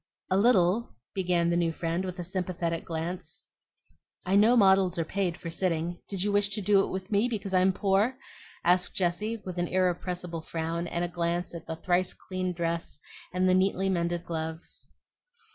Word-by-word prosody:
"A 190 - +4
little," 200 - +3 0.2
began 175 -3 +1
the - - +2
new 170 -1 +2
friend, 165 +2 -2
with 185 0 -5
a 175 - -4
sympathetic 175 -2 -2
glance. 165 - -5 0.8
"I 185 +2 +2
know 220 +5 +6
models 190 -3 +5
are 165 - 0
paid 185 -1 -1
for 165 - -6
sitting; 170 0 -1
did 195 -2 0
you 205 - +1
wish 205 0 +2
to - - -1
do 200 +1 +4
it - - -3
with 190 +2 -5
me 210 +4 +3
because 200 -4 -4
I'm 185 +1 +5
poor?" 200 +7 +1 0.5
asked 180 +1 +2
Jessie, 195 +5 0
with 180 -1 -4
an 175 - 0
irrepressible 180 -2 -1
frown 165 +1 -3
and 170 +1 -1
a - - -2
glance 175 0 -2
at 170 -2 -8
the 160 - -3
thrice 180 +2 +1
cleaned 185 -1 -4
dress 170 -2 -2 0.3
and 185 +1 +1
the 185 - +4
neatly 190 +1 +2
mended 175 -1 -1
gloves. 160 0 -4
180 Hz, 180 wpm, -28 LUFS, 170-190 Hz, 0.8 s, know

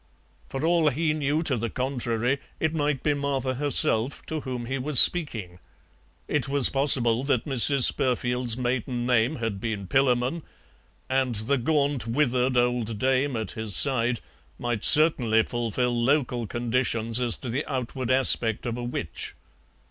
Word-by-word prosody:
For 135 +3 -5
all 165 -2 +2
he 155 +3 -2
knew 150 +1 -2
to 140 -5 -2
the 115 +1 -4
contrary, 125 0 -3 0.2
it 160 0 -2
might 145 -4 -2
be 150 - 0
Martha 140 -2 -3
herself 130 -2 0
to 160 - -5
whom 125 -4 -7
he 135 +3 -4
was 140 0 +4
speaking. 110 - +5 0.7
It 140 -2 -2
was 140 -2 +2
possible 130 -4 +1
that 135 -5 -1
Mrs. 135 0 +3
Spurfield's 125 -2 +2
maiden 125 -1 -3
name 125 +3 0
had 115 -6 -5
been 110 -4 -5
Pillamon. 130 - 0 0.7
And 130 -2 -1
the 120 +6 -2
gaunt, 140 -3 -1
withered 125 0 -1
old 120 -3 -1
dame 130 +3 -1
at 110 -3 -5
his 110 -3 +1
side 120 -3 +2 0.4
might 120 -3 -4
certainly 125 -8 +4
fulfil 120 +1 -3
local 125 -4 -1
conditions 115 0 -2
as 120 -2 +2
to 125 - -9
the 130 +6 -3
outward 130 -1 -5
aspect 125 -4 +5
of 120 -1 -4
a - - -6
witch. 120 -9 -6
125 Hz, 150 wpm, -24 LUFS, 115-140 Hz, 0.7 s, speaking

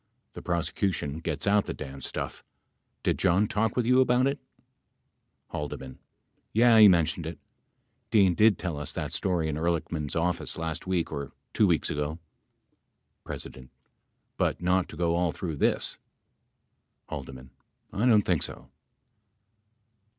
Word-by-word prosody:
The - - -8
prosecution 85 -3 -1
gets 80 -2 -3
out 100 0 +3
the - - -4
damn 70 -2 -8
stuff. - - -5 0.6
Did - - +1
John 95 +5 +3
talk 105 +1 0
with 125 - +1
you 125 +2 +5
about 125 0 +3
it? 140 +1 0 1.1
H. 75 -1 -4 0.7
Yeh, 115 0 +6
he 105 - +10
mentioned 85 -2 +2
it. 85 - -6 0.7
Dean 100 -5 +5
did 105 +3 +4
tell 85 -5 -4
us 75 - -5
that - - -4
story 85 -4 0
in 75 -1 -2
Ehrlichman's 80 -2 -2
office 85 +1 -1
last 80 +1 -4
week 90 -3 0
or 70 -2 -5 0.2
two - - +4
weeks - - +1
ago. 75 +2 -2 1.1
P. 65 -1 -8 0.7
But - - 0
not 90 +1 +1
to 80 - -10
go 85 -1 +1
all 85 -1 +1
through 80 -4 -5
this. - - 0 1.1
H. - - -5 0.7
I 105 +5 0
don't 110 -4 +5
think 90 -4 +1
so. 65 +1 -6
85 Hz, 140 wpm, -28 LUFS, 80-105 Hz, 1.1 s, he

